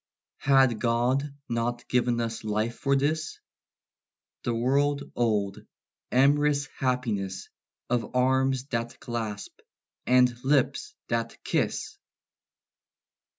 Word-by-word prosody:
Had 135 -5 +4
God 125 +4 +1 0.2
not 120 +1 -2
giv'n 120 -1 +1
us 115 -1 -3
life 110 +2 -1
for 140 0 +2
this? 155 +3 -1 1.0
The 120 - 0
world 140 +4 +1
old, 105 -5 0 0.5
amorous 145 +2 +3
happiness 115 -8 -1 0.4
Of 125 0 -2
arms 130 0 +2
that 115 -2 -3
clasp, 110 -4 -5 0.5
and 125 -1 +5
lips 135 0 +1
that 115 0 -1
kiss! - - -1
125 Hz, 95 wpm, -27 LUFS, 115-135 Hz, 1.0 s, and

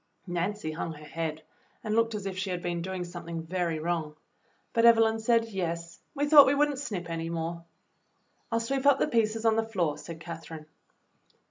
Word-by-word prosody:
Nancy 175 0 -2
hung 165 +1 -4
her 150 0 -12
head 160 0 -4 0.4
and 215 -2 -2
looked 230 -1 +2
as 205 -2 -5
if 195 -1 -3
she 190 +1 -3
had 180 -1 -3
been 175 -1 -2
doing 185 +1 -4
something 170 -2 -6
very 170 -1 -1
wrong, 160 -1 -2 0.6
but 230 - +2
Evelyn 225 -1 +6
said, 230 0 +3
"Yes, 170 -5 -4 0.2
we 290 +1 +1
thought 290 -2 +9
we 275 - +3
would 295 +1 +3
n't 275 - -5
snip 200 -11 -4
any 165 0 -3
more." 170 0 -3 0.9
"I - - +1
'II 230 - +2
sweep 270 +4 0
up 285 - +6
the - - +1
pieces 225 -1 +1
on 225 -1 +4
the 225 - +2
floor," 185 -9 -1
said 165 -1 -8
Cather 165 -1 -8
ine. 155 -1 -10
180 Hz, 205 wpm, -29 LUFS, 165-225 Hz, 0.9 s, thought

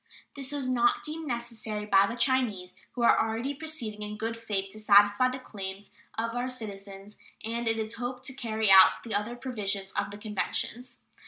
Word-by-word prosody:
This 275 -1 0
was 285 -3 -2
not 245 -2 +2
deemed 310 +1 -4
necessary 230 -4 -3
by 200 -1 +5
the 230 - -4
Chinese, 235 -8 +1 0.2
who 240 - -2
are - - +6
already 225 +5 -2
proceeding 280 -8 -3
in 210 0 -5
good 225 +1 -3
faith 205 -4 -3
to 215 - -8
satisfy 205 +3 +5
the 255 - -4
claims 195 -5 -7 0.3
of 230 +1 -1
our 245 +1 -2
citizens 200 -4 -8 0.3
and, 230 +1 -3
it 225 0 +1
is 220 0 -3
hoped, 250 +1 -4
to 270 - -1
carry 220 -5 0
out 190 -1 +7
the 230 - -5
other 210 +4 -1
provisions 205 -6 -3
of - - -2
the 205 - -8
conventions. 225 +4 -3
225 Hz, 185 wpm, -28 LUFS, 205-250 Hz, 0.3 s, out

